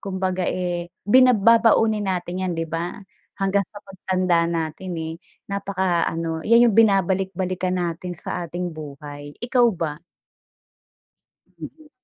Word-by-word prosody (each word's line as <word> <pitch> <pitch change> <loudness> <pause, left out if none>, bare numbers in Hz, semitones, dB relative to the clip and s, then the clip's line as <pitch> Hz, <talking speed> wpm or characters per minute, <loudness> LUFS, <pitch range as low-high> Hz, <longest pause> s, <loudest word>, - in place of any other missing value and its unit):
kumbaga, 185 -2 -2
eh, 175 -1 -3
bina 255 +4 +6
babaunin 220 -1 +4
natin 180 -1 -2
yan 180 - -1
di 165 - -1
ba? 165 +2 -4 0.4
Hanggang 195 -1 +1
sa 205 -1 -12
pagtanda 185 -3 0
natin, 170 +2 -3
eh, 160 0 -4 0.4
napaka 190 -3 0
ano, 165 -1 -3
yan 235 +1 +6
yung - - -2
binabalik-balikan 190 -3 +2
natin 175 0 -3
sa 175 +1 -5
ating 175 0 -4
buhay, 145 -1 -9
ikaw 245 -1 +4
ba? 155 -3 -3 1.6
Mm. 310 -2 -10
185 Hz, 125 wpm, -23 LUFS, 170-200 Hz, 1.6 s, bina